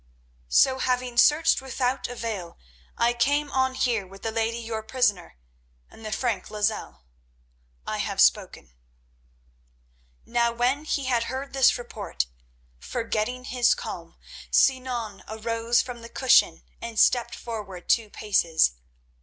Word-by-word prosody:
"So, 260 - +4
having 250 -1 -1
searched 300 +6 +4
without 260 0 -2
avail, 225 -8 -5 0.4
I 235 +1 +3
came 285 +5 +1
on 260 0 +1
here 230 -7 0
with 195 +1 -14
the 225 - -2
lady 225 +1 -1
your 225 -1 -4
prisoner 220 - -1 0.5
and 225 - -15
the 215 - -5
Frank 215 -4 -2
Lozelle. 210 - -2 0.8
I - - -3
have - - -3
spoken." 60 0 +2 1.5
Now 235 0 +1
when 255 +5 0
he 280 -3 -1
had 240 -3 +1
heard 265 +2 -5
this 270 -1 +4
report, 235 - -4 0.5
forgetting 230 - -3
his 250 - +2
calm, - - -8 0.3
Sinan 245 -6 +1
arose 230 +2 0
from 245 -2 -8
the 230 - -10
cushion 260 +1 +3 0.2
and 230 -2 -4
stepped 240 -2 +3
forward 205 -6 -7
two 225 -2 +2
paces. 170 -7 +2
235 Hz, 130 wpm, -25 LUFS, 215-255 Hz, 1.5 s, So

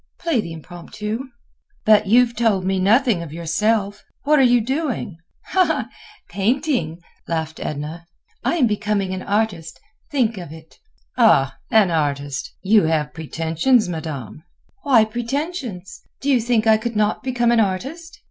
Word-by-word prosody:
Play 325 -9 0
the 170 - -8
Impromptu." 210 - -6 0.6
"But 215 -1 +5
you 245 +5 +6
have 235 -1 -11
told 210 -6 +1
me 190 0 0
nothing 220 0 +3
of 165 -3 -8
yourself. 200 +5 -1 0.2
What 300 +1 +4
are - - +6
you 245 -2 +5
doing?" 250 - -3 1.1
"Painting!" 200 - -1 0.2
laughed 160 -1 -3
Edna. 155 +3 -5 0.4
"I - - +1
am 300 -7 +3
becoming 210 -3 -1
an 185 - -4
artist. 200 -6 -2 0.3
Think 235 -7 0
of 175 -5 -9
it!" 160 0 -14 0.4
"Ah! 140 - +4
an 215 -6 +4
artist! 145 -3 -2
You 205 -2 +4
have 155 -2 0
pretensions, 165 - +1
Madame." 155 - -6 0.4
"Why 255 -9 +4
pretensions? 240 - -4 0.2
Do 280 - 0
you 250 -3 +3
think 230 -1 +1
I 220 -1 +5
could 230 +1 -4
not 210 0 +1
become 245 -3 +1
an 235 - +3
artist?" 265 - -2
210 Hz, 145 wpm, -21 LUFS, 165-240 Hz, 1.1 s, you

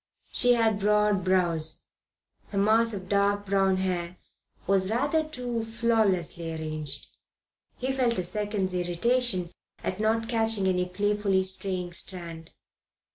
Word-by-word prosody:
She 245 -1 +4
had 225 -3 +2
broad 210 -1 +2
brows. 170 -4 0 0.7
Her 200 - -5
mass 220 +3 +4
of 190 -3 -6
dark 200 +1 +1
brown 195 -1 +2
hair 180 -1 -2 0.5
was 190 0 +2
rather 285 +8 +1
too 250 -6 -4
flawlessly 220 -8 0
arranged. 155 -3 -5 0.7
He 260 +1 -2
felt 250 -4 +1
a 185 - 0
second's 205 0 -1
irritation 180 +2 0 0.3
at 185 - -3
not 225 +1 +1
catching 225 -3 +1
any 180 -1 +2
playfully 205 0 +1
straying 185 -2 -2
strand. 170 -3 -2
195 Hz, 125 wpm, -27 LUFS, 180-225 Hz, 0.7 s, She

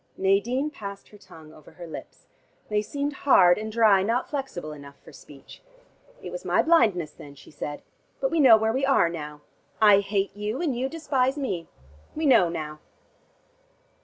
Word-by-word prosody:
Nadine 235 +10 +1
passed 200 -6 -9
her 210 - -16
tongue 160 -5 -15
over 155 -3 -17
her 175 - -10
lips. 160 - -11 0.4
They 210 0 +1
seemed 285 +6 -4
hard 180 -9 +5
and 220 0 -5
dry, 215 -4 +4
not 230 +6 -1
flexible 265 - -5
enough 140 -1 -13
for - - -17
speech. 140 -2 -15 0.6
"It - - -7
was - - -7
my - - +2
blindness 215 - +2
then," 145 -1 -13
she - - -16
said. 145 0 -7 0.4
"But 270 - -1
we 330 - 0
know 250 -6 +8
where 220 +1 0
we 265 +2 -2
are 270 -11 +3
now. 150 -3 -8 0.4
I 210 -2 +6
hate 200 0 -2
you, 210 +5 -4
and 310 -7 -1
you 260 +2 -2
despise 275 -4 -1
me. 185 - -4 0.5
We 315 +1 -2
know 215 - +5
now." 155 -2 -6
210 Hz, 175 wpm, -25 LUFS, 170-265 Hz, 0.6 s, know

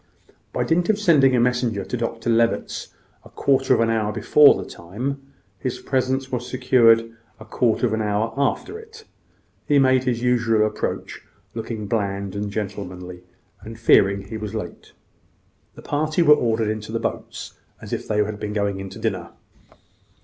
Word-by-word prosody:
By - - -1
dint 170 +3 +1
of 215 - +3
sending 145 -10 +4
a - - +3
messenger 120 -4 0
to - - -4
Dr 115 -1 -2
Levitt's 115 0 0 0.4
a - - -15
quarter 135 -1 +1
of - - +1
an 115 0 +2
hour 110 -2 0
before 150 +6 +6
the 95 - -6
time, 120 +11 -5 0.4
his 125 +3 -3
presence 130 0 -1
was 125 -1 -3
secured 115 -3 +3 0.3
a 110 - -11
quarter 115 +1 +1
of 110 - 0
an 110 - 0
hour 105 +2 -1
after 140 - -1
it. 450 0 -14 0.6
He 145 - +4
made 130 -1 +4
his 120 -2 -1
usual 115 -3 +2
approach 105 0 -4 0.3
looking 110 -1 -5
bland 100 -2 -2
and 100 0 -3
gentlemanly, 90 -3 -6 0.4
and 115 +1 -10
fearing 100 -3 +4
he 105 +3 -7
was 105 0 -6
late. 90 -6 -7 0.8
The - - -13
party 155 +3 0
were 150 -2 +8
ordered 115 -5 +1
into 110 0 -4
the 115 - -1
boats - - -5 0.3
as - - -8
if - - -4
they 105 0 +2
had 105 0 -5
been 105 0 -4
going 100 -2 -2
to 95 - -11
dinner. - - -3
115 Hz, 170 wpm, -22 LUFS, 105-130 Hz, 0.8 s, were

